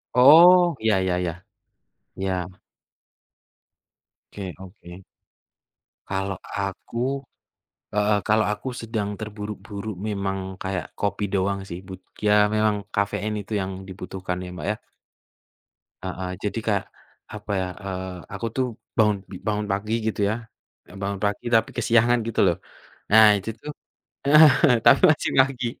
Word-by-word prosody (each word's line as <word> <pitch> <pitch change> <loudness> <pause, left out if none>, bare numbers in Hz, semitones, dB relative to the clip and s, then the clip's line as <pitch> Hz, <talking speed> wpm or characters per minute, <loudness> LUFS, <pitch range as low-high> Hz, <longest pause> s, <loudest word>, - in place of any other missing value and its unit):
Oh 170 +6 +8
iya, 110 -1 +2
ya 90 - +1
ya, 90 -2 -1 0.9
iya. 95 -1 -3 1.7
Oke 95 -3 -6
oke. 95 -1 -12 1.0
Kalau 95 -1 -3
aku 115 +7 -3 0.7
heeh, 105 0 +2
kalau 110 +1 +2
aku 105 +5 -3
sedang 105 -3 -3
terburu-buru 105 -1 -6
memang 95 -1 -3
kayak 95 -1 -4
kopi 100 0 -2
doang 100 0 0
sih 90 -1 -7
but 95 -1 -9 0.2
ya 105 0 +5
memang 105 -2 +1
kafein 100 +1 -1
itu 105 +1 -3
yang 95 -1 -2 0.2
dibutuhkan 90 0 -5
ya 90 - -8
Mbak 85 -1 -6
ya? 105 - -4 1.3
Heeh, 95 0 -4
jadi 105 +2 -2
kayak 100 -3 +1 0.5
apa 105 -1 -6
ya, - - -1 0.2
eee, 95 -1 -4 0.3
aku 115 - -4
tuh 130 - +1 0.3
bangun, 105 -2 +4
b - - -17 0.2
bangun 105 0 -1
pagi 105 +3 -3
gitu 110 - -2
ya, - - +1 0.5
ya - - -15
bangun 100 0 -3
pagi 100 +2 -2
tapi 110 0 +3
kesiangan 120 +1 +3
gitu 115 - -2
loh 85 - +1 0.5
nah 110 +1 +8
itu 100 +2 -6
tuh 150 - -7 0.6
heeh, 145 -3 +7
tapi 135 - +7
masih 155 - +1
pagi 130 -2 +2
105 Hz, 135 wpm, -24 LUFS, 95-110 Hz, 1.7 s, Oh